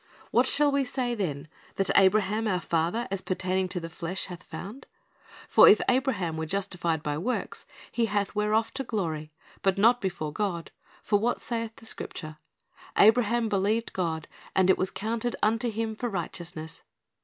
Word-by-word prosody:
"What - - +4
shall 295 -1 +4
we 280 0 +2
say 250 -1 -2
then 155 -10 -3 0.3
that 195 - 0
Abraham 210 +3 +4
our 185 -3 +1
father, 170 +9 0
as 195 -1 -2
pertaining 185 0 -1
to 180 - -3
the 165 - -6
flesh, 170 +3 -4
hath 180 -2 -8
found? 200 +10 -9 0.6
For - - +8
if - - +7
Abraham 240 - +1
were 160 0 -3
justified 175 -4 -1
by 150 0 -2
works, 245 +9 -3 0.2
he 235 -1 +1
hath 205 -2 -1
whereof 210 +2 +1
to 270 - -3
glory; 160 -10 -3 0.3
but 195 0 +2
not 235 +4 +5
before 175 -6 -3
God. 180 -5 -2 0.3
For 205 -1 +2
what 235 +3 0
saith 230 -2 -4
the 225 - -15
Scripture? 155 -7 -6 0.6
Abraham 230 +1 +5
believed 210 +3 0
God, 160 -4 -2 0.3
and 190 0 +5
it - - +2
was 185 - +1
counted 230 +3 -2
unto 225 +3 +2
him 220 0 -2
for 240 +2 -3
righteousness. 170 -4 -5
200 Hz, 165 wpm, -28 LUFS, 175-225 Hz, 0.6 s, For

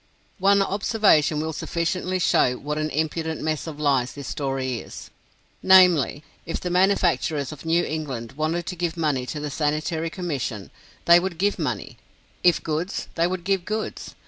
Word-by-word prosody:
One 200 +1 +4
observation 195 -7 +2
will 160 +1 -2
sufficiently 180 +4 -2
show 130 -7 +3
what 150 +1 -4
an 155 0 -1
impudent 160 +1 -2
mess 155 -1 -2
of 150 -2 -7
lies 135 -4 +1
this 140 -2 -8
story 135 -3 -2
is, - - -10 0.5
namely; 180 -6 +5 0.2
If 165 - -4
the 180 - -4
manufacturers 175 -6 +2
of 150 +1 -10
New 170 +2 +2
England 135 -7 -4
wanted 155 +4 -2
to 180 - -4
give 170 -1 -2
money 145 -6 0
to 150 - -4
the 150 -1 -4
Sanitary 155 +3 -1
Commission, 140 - -4 0.3
they 170 0 +8
would 180 -1 -4
give 200 +3 0
money; - - -4 0.4
if 175 -2 +4
goods, 165 +4 -3
they 170 +1 +1
would 180 -1 -4
give 195 0 0
goods. 215 +4 -5
160 Hz, 165 wpm, -24 LUFS, 150-180 Hz, 0.5 s, they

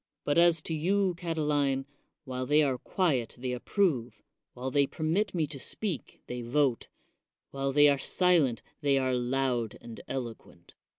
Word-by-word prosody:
But 145 +3 +2
as 170 -2 +4
to 165 - -4
you, 185 +4 +1
Catiline, 150 -5 0 0.4
while 130 -1 -4
they 150 +1 +5
are 130 -3 0
quiet 145 -11 0
they 125 +1 -3
approve, 125 - -1 0.3
while 130 +1 -4
they 140 0 +3
permit 170 +8 -1
me 160 -3 +1
to 145 -2 -8
speak 190 +2 -4
they 125 0 -5
vote, 130 +1 +1 0.6
while 135 0 -2
they 145 +1 +6
are 140 -1 +3
silent 160 -7 +2 0.2
they 140 -2 +3
are 130 -1 +1
loud 125 -2 0
and 115 -1 -10
eloquent. 115 -9 -7
140 Hz, 155 wpm, -29 LUFS, 125-160 Hz, 0.6 s, they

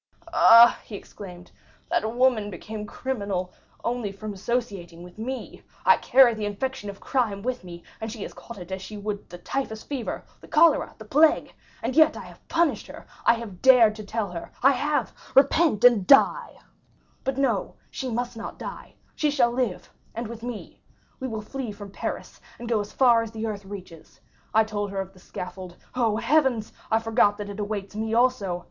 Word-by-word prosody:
"Ah," 235 -6 +8
he 215 - -9
exclaimed, 180 -3 -11 0.4
"that 220 +1 +1
woman 245 -5 +3
became 210 +3 -7
criminal 200 -8 -3 0.3
only 235 -4 -2
from 210 +1 -7
associating 195 -5 -3
with 180 +4 -13
me! 255 +4 -5 0.2
I - - +7
carried 250 -4 +5
the 210 - -2
infection 205 +1 -4
of 200 - -9
crime 220 -7 -1
with 250 -3 -3
me, 175 -1 -10 0.2
and 220 0 -4
she 220 -3 -6
has - - -7
caught 235 - -11
it 180 0 -10
as 190 0 -4
she 210 +2 -8
would 205 0 -5
the 175 - -9
typhus 220 +3 -4
fever, 270 -5 -4 0.2
the - - -15
cholera, 320 0 +4
the 220 - -11
plague! 300 +8 +3 0.3
And 260 - -2
yet 315 -1 +5
I - - -6
have - - -15
punished 335 -1 +1
her—I - - -1
have 215 -6 -8
dared 250 -5 +7
to 215 - -7
tell 210 -2 -3
her—I 180 +9 +1
have—'Repent 285 -1 +2
and 235 -6 +6
die!' 275 - +5 0.7
But 270 0 -2
no, 245 -8 0 0.2
she 265 - -4
must 240 +1 -3
not 225 - -7
die; - - -8 0.2
she 300 - +1
shall 255 -5 +3
live, 240 -6 -2 0.2
and 230 0 -4
with 230 0 -8
me. 240 -2 -7 0.4
We 260 - -3
will 220 -3 -5
flee 255 0 -5
from 205 -1 -10
Paris - - -6 0.2
and 240 - -8
go 230 -2 +1
as 205 0 -5
far 240 -3 +5
as 230 - -4
the 220 0 -5
earth 205 -3 -5
reaches. 185 -5 -11 0.3
I 220 +1 +5
told 205 -2 -3
her 195 0 -4
of 190 0 -5
the 185 - -18
scaffold; 180 -1 -8 0.2
oh, 230 -4 +1
Heavens, 250 -3 +1 0.2
I 220 - +3
forgot 225 -2 +2
that 205 -1 -6
it 200 - -8
awaits 205 -1 -4
me 220 +1 -2
also! 230 -8 +2
220 Hz, 185 wpm, -25 LUFS, 200-250 Hz, 0.7 s, Ah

